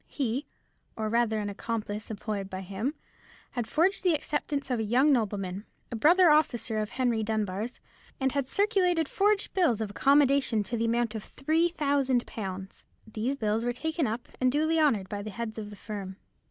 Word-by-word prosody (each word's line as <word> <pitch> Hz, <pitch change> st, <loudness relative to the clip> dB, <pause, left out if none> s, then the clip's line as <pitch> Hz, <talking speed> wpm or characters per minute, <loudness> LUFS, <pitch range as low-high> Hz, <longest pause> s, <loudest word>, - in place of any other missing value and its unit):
He, 265 Hz, +1 st, -2 dB, 0.5 s
or 220 Hz, -1 st, -2 dB
rather 230 Hz, -1 st, +2 dB
an 210 Hz, -1 st, -2 dB
accomplice 210 Hz, 0 st, -4 dB
employed 205 Hz, -2 st, -4 dB
by 185 Hz, 0 st, -5 dB
him, 200 Hz, -, -3 dB, 0.6 s
had 240 Hz, -3 st, -3 dB
forged 345 Hz, -, +2 dB
the 355 Hz, -4 st, +4 dB
acceptance 290 Hz, -2 st, -2 dB
of 245 Hz, -, +1 dB
a -, -, 0 dB
young 250 Hz, +7 st, +4 dB
nobleman, 200 Hz, -5 st, -1 dB, 0.3 s
a -, -, -3 dB
brother 335 Hz, +8 st, +6 dB
officer 240 Hz, -7 st, +2 dB
of 215 Hz, -1 st, -2 dB
Henry 245 Hz, -4 st, 0 dB
Dunbar's, 215 Hz, +1 st, -2 dB, 0.4 s
and 265 Hz, -1 st, +1 dB
had 275 Hz, -1 st, -1 dB
circulated 365 Hz, -4 st, +2 dB
forged 410 Hz, +4 st, +1 dB
bills 330 Hz, -, +2 dB
of 215 Hz, -2 st, -3 dB
accommodation 275 Hz, -3 st, +3 dB
to 220 Hz, +4 st, -3 dB
the 230 Hz, 0 st, 0 dB
amount 230 Hz, -1 st, +1 dB
of 220 Hz, -2 st, -5 dB
three 320 Hz, +5 st, +1 dB
thousand 280 Hz, -6 st, +1 dB
pounds. 190 Hz, -2 st, -7 dB, 0.2 s
These 225 Hz, +5 st, -2 dB
bills 220 Hz, -3 st, 0 dB
were 245 Hz, 0 st, 0 dB
taken 315 Hz, +3 st, -1 dB
up 225 Hz, +3 st, -4 dB
and 255 Hz, 0 st, +3 dB
duly 315 Hz, +3 st, +2 dB
honoured 230 Hz, -11 st, +2 dB
by 205 Hz, +1 st, -4 dB
the 215 Hz, -, -6 dB
heads 220 Hz, +2 st, -5 dB
of 210 Hz, -1 st, -6 dB
the 205 Hz, -, -10 dB
firm. 200 Hz, -3 st, -6 dB
235 Hz, 180 wpm, -28 LUFS, 215-285 Hz, 0.6 s, brother